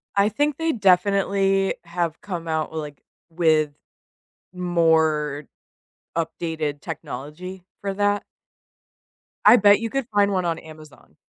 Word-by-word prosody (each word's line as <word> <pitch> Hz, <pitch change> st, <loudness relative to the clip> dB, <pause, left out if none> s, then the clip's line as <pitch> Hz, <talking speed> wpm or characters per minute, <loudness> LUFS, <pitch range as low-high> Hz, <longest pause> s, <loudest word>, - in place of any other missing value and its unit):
I 200 Hz, +1 st, +4 dB
think 290 Hz, +6 st, 0 dB
they 325 Hz, 0 st, 0 dB
definitely 195 Hz, -1 st, +2 dB
have 170 Hz, -2 st, -3 dB
come 175 Hz, -5 st, -5 dB
out 160 Hz, -1 st, -1 dB
with, 160 Hz, -, -4 dB
like 145 Hz, -2 st, -9 dB, 0.3 s
with 160 Hz, -3 st, +2 dB, 0.8 s
more 160 Hz, -5 st, +1 dB, 0.7 s
updated 160 Hz, -3 st, -3 dB
technology 170 Hz, +8 st, -7 dB, 0.2 s
for 200 Hz, -1 st, -2 dB
that. 205 Hz, 0 st, +1 dB, 1.2 s
I 215 Hz, -, +10 dB
bet 205 Hz, -1 st, +6 dB
you 230 Hz, -, -3 dB
could 270 Hz, 0 st, -2 dB
find 205 Hz, -1 st, +3 dB
1 185 Hz, -2 st, 0 dB
on 165 Hz, -1 st, -1 dB
Amazon. 155 Hz, -2 st, -15 dB
175 Hz, 120 wpm, -23 LUFS, 160-200 Hz, 1.2 s, I